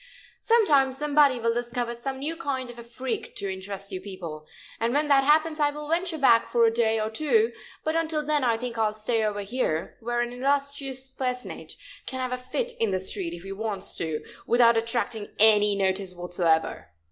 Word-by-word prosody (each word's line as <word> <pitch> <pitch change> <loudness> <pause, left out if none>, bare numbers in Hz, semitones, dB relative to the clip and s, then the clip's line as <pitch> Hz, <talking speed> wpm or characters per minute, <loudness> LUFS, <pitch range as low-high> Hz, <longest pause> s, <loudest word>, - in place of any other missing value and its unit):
Some 460 -1 +4
time 270 -5 +4
somebody 285 -2 +3
will 230 0 +1
discover 240 0 -2
some 265 +3 -5
new 300 +5 -3
kind 260 -5 -3
of 240 - -12
a - - -8
freak 240 +2 -5
to 195 -1 -2
interest 195 +1 -6
you 185 -1 -4
people, 170 -6 -8 0.3
and 235 +3 0
when 295 +1 +2
that 275 -1 +5
happens 310 +2 +3
I 295 -1 +4
will 295 +1 -7
venture 340 0 0
back 235 -5 +5
for 235 -1 +3
a 225 - +3
day 225 -1 +2
or 215 0 -2
two, 430 - +2 0.3
but 315 +1 -1
until 315 -2 0
then 295 -2 +2
I 230 -2 +2
think 235 -1 -5
I 220 - +3
will 210 - -4
stay 220 +1 0
over 205 -1 -1
here, 195 -7 -2
where 240 +1 -1
an 240 0 -3
illustrious 275 0 -1
personage 255 -1 -5 0.3
can 260 - -4
have 255 -1 -2
a 250 0 -4
fit 470 - -2
in 225 - +2
the 190 -1 0
street, 185 -2 -3
if 170 - -11
he 195 - -7
wants 200 -1 -4
to, 160 -2 -3 0.2
without 235 -1 +5
attracting 225 -1 0
any 210 -1 +5
notice 190 -1 -1
whatsoever. 175 -2 0
240 Hz, 205 wpm, -26 LUFS, 205-275 Hz, 0.3 s, that